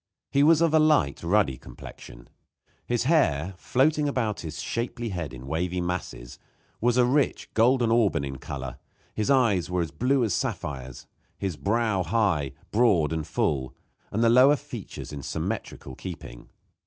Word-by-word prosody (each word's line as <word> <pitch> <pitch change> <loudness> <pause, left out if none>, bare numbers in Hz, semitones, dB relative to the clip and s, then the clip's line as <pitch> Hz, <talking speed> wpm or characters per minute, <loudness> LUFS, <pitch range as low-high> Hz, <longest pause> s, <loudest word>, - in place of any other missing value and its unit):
He 140 - +3
was 160 +2 +5
of 165 -2 +3
a 160 - +6
light, 150 - +3
ruddy 85 -8 +1
complexion; - - -12 0.6
his 120 -1 0
hair, 95 - +2
floating 145 - +1
about 115 -7 -1
his 80 -1 -6
shapely 120 0 -3
head 85 -7 -4
in 65 -1 -10
wavy 85 +5 -2
masses, 85 -9 -5 0.4
was 120 +1 +2
a 125 - +5
rich, 140 +3 0
golden 120 0 +3
auburn 105 -10 +2
in 70 -1 -5
color; 65 -1 -6 0.3
his 110 - -2
eyes 115 -11 +3
were 90 -1 0
blue 125 - +1
as 110 -6 0
sapphires; 65 -5 -4 0.3
his 95 -4 -3
brow 110 +1 0
high, 90 - 0 0.2
broad 100 -9 +3
and 80 -2 -3
full, 65 -3 -1 0.4
with 110 - -1
the 115 - +5
lower 130 +4 +7
features 135 - -8
in 70 - -6
symmetrical - - -5
keeping. 80 -9 -9
100 Hz, 155 wpm, -26 LUFS, 75-125 Hz, 0.6 s, lower